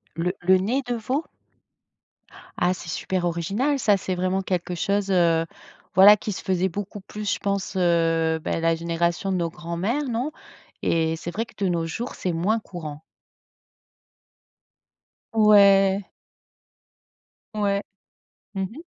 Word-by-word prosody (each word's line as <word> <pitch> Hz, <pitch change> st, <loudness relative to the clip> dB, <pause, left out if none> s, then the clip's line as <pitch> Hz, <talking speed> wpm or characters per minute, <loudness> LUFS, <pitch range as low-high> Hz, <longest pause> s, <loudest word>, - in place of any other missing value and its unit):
Le 180 Hz, +2 st, -1 dB
le 185 Hz, +1 st, +5 dB
nez 235 Hz, +9 st, 0 dB
de 245 Hz, -, -1 dB
veau? 255 Hz, +8 st, -2 dB, 1.3 s
Ah 180 Hz, +1 st, +2 dB
c'est 175 Hz, -2 st, -9 dB
super 185 Hz, +1 st, -2 dB
original, 200 Hz, -, 0 dB
ça! 205 Hz, -4 st, +3 dB
C'est 185 Hz, 0 st, -3 dB
vraiment 185 Hz, +1 st, 0 dB
quelque 180 Hz, -1 st, -2 dB
chose, 200 Hz, +3 st, 0 dB
heu, 170 Hz, -2 st, +3 dB, 0.5 s
voilà, 205 Hz, +3 st, +9 dB
qui 210 Hz, -, -4 dB
se -, -, -5 dB
faisait 185 Hz, 0 st, +1 dB
beaucoup 205 Hz, +3 st, -6 dB
plus, 210 Hz, +1 st, -4 dB
je -, -, -4 dB
pense, 200 Hz, -1 st, -2 dB
heu, 165 Hz, -2 st, +2 dB
bah, -, -, -1 dB
la 165 Hz, 0 st, +2 dB
génération 170 Hz, +3 st, -1 dB
de 185 Hz, -, +1 dB
nos 170 Hz, -1 st, -1 dB
grands-mères, 175 Hz, -, -3 dB
non? 245 Hz, +6 st, -2 dB, 0.5 s
Et 160 Hz, -1 st, +1 dB
c'est 175 Hz, +1 st, -6 dB
vrai 225 Hz, +5 st, -2 dB
que -, -, -20 dB
de 190 Hz, -, +2 dB
nos 165 Hz, -1 st, 0 dB
jours, 235 Hz, +10 st, -5 dB
c'est 180 Hz, -2 st, -2 dB
moins 200 Hz, +7 st, +1 dB
courant. 160 Hz, -7 st, -8 dB, 2.3 s
Ouais! 200 Hz, -2 st, +5 dB, 1.4 s
Ouais. 200 Hz, -1 st, 0 dB, 0.7 s
Mmh 195 Hz, -, -2 dB
mh. 235 Hz, -, -8 dB
190 Hz, 140 wpm, -24 LUFS, 170-205 Hz, 2.3 s, voilà